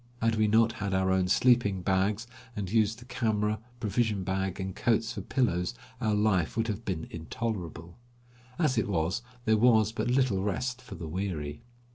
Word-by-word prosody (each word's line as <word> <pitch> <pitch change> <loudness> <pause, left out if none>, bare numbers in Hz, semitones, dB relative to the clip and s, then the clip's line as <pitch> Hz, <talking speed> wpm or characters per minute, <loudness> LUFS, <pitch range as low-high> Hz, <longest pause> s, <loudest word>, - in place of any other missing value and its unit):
Had 115 0 +2
we 110 0 +3
not 110 +2 +4
had 100 -3 -2
our 95 0 +2
own 95 -1 +2
sleeping 100 -3 +3
bags, 100 +4 +1 0.3
and 100 -3 -4
used 110 0 +2
the 120 - -13
camera, 110 -4 0 0.2
provision 110 -2 0
bag, 95 0 -2
and 95 -1 -4
coats 115 0 +1
for - - -5
pillows, 115 -5 0 0.3
our 110 -3 +2
life 105 -3 +1
would 115 0 +1
have 105 +2 -3
been 90 -6 -3
intolerable. 85 0 -5 0.6
As 145 -8 +2
it - - -1
was 90 +4 0 0.2
there 110 0 +4
was 110 -2 +5
but 120 +1 -2
little 125 -7 +2
rest 125 +6 -2
for 125 - -9
the 85 - -6
weary. 80 -4 -3
105 Hz, 175 wpm, -29 LUFS, 95-115 Hz, 0.6 s, was